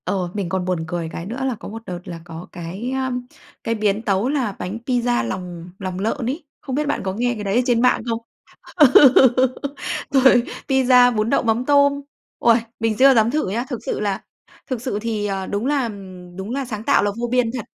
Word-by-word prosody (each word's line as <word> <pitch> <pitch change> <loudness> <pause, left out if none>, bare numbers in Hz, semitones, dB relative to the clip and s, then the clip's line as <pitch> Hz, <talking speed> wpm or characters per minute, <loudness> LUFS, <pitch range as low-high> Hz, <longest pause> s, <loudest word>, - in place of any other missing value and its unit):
Ồ, 185 -2 -1
mình 200 -4 -3
còn 185 -1 -1
buồn 180 -3 -1
cười 170 -1 -3
cái 170 - -6
nữa 225 +6 -5
là 260 -3 -1
có 215 - -10
một 225 +2 -7
đợt 180 -2 -5
là 170 -2 -7
có 165 +1 -9
cái, 185 +8 -6
a, 265 -1 -1 0.5
cái 230 - -1
biến 210 -1 0
tấu 205 +2 0
là 265 -7 0
bánh 190 +5 -4
pizza 245 - +1
lòng 175 +3 -6
lòng 185 -2 -4
lợn 225 +5 -2
ấy. 275 +8 -3 0.2
Không 260 - -4
biết 300 +1 -1
bạn - - -1
có 190 -1 -2
nghe 245 +4 0
cái 210 - -6
đấy 200 0 -1
ở 245 - +4
trên 240 -2 +2
mạng 250 - +3
không? 230 0 -1 0.6
Ừ, 300 -6 +7 1.2
rồi, 265 -3 +5 0.3
pizza, 250 -2 +5
bún 215 +2 0
đậu - - +2
mắm 230 +1 +1
tôm. 285 -1 +4 0.4
Uầy, 235 -1 +5 0.2
mình 225 -1 0
chưa 270 +1 +7
dám 225 -1 +3
thử 305 -6 -1
nhá. 235 +5 -1
Thực 250 -5 -4
sự - - -2
là 200 -2 -2 0.5
thực 250 -3 -2
sự 250 -5 -2
thì, 215 -2 -2
ờ, 195 -1 -3
đúng 205 +4 -2
là, 285 -1 +1
ừm, 185 -5 -8
đúng 190 +3 -6
là 275 +2 -2
sáng 220 -4 -6
tạo - - +3
là 205 - +1
vô 240 - -1
biên 250 -2 +2
thật. 250 -4 -4
225 Hz, 225 wpm, -21 LUFS, 190-255 Hz, 1.2 s, Ừ